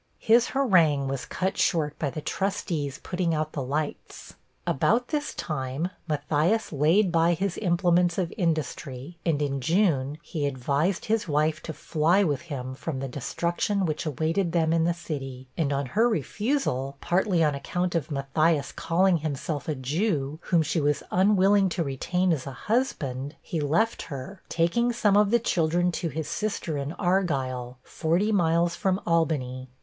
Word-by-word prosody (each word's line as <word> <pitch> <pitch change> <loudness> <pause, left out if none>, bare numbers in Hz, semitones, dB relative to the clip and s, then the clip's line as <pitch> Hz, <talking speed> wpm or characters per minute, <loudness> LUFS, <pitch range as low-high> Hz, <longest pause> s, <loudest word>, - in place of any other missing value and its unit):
His 230 +1 +4
harangue 170 - +3
was 135 -2 -3
cut 190 +1 -2
short 150 -4 +1
by 145 - 0
the 155 - -6
trustees 165 -7 -2
putting 175 -3 -1
out 155 0 -2
the 145 - -4
lights. 145 +4 -4 0.3
About 230 - +1
this 295 -1 -1
time, 150 +3 -3 0.2
Matthias 155 +7 0
laid 170 +7 +3
by 165 0 +3
his 190 +1 -2
implements 175 -2 +2
of 180 -3 -1
industry, 155 - -3
and 160 -4 +1
in 140 -1 -2
June, 155 -4 +1
he 150 -4 -2
advised 140 +7 0
his 220 -2 0
wife 155 +1 +1
to 160 - -6
fly 165 +5 +2
with 150 -5 0
him 130 -3 -4
from 135 +2 -5
the 135 - -3
destruction 170 +9 -1
which 155 0 -2
awaited 165 +4 0
them 165 -2 +2
in 165 -1 +2
the 175 - +2
city; 135 -6 -6
and 150 -4 0
on 140 0 0
her 220 - +2
refusal, 205 - -1
partly 180 -1 +2
on 150 -2 +2
account 175 +5 -2
of 165 -3 -1
Matthias 145 +2 +1
calling 180 +1 +2
himself 150 -1 -3
a 155 - 0
Jew, 145 - -1
whom 170 -3 +3
she 155 +1 0
was 145 0 +1
unwilling 195 +1 +4
to 170 - -1
retain 180 +6 0
as 140 -3 -4
a - - -4
husband, 145 - -1
he 165 - -4
left 165 +11 +1
her, 165 +6 -7
taking 205 +9 +2
some 210 -4 +2
of 205 0 +5
the 235 - +5
children 175 -4 +1
to 170 -1 -2
his 155 +1 -4
sister 205 -7 -2
in 140 +1 -3
Argyle, 135 -10 -1
forty 175 +7 0
miles 170 -3 +2
from 190 -1 0
Albany. 135 -6 0
165 Hz, 165 wpm, -26 LUFS, 145-185 Hz, 0.3 s, of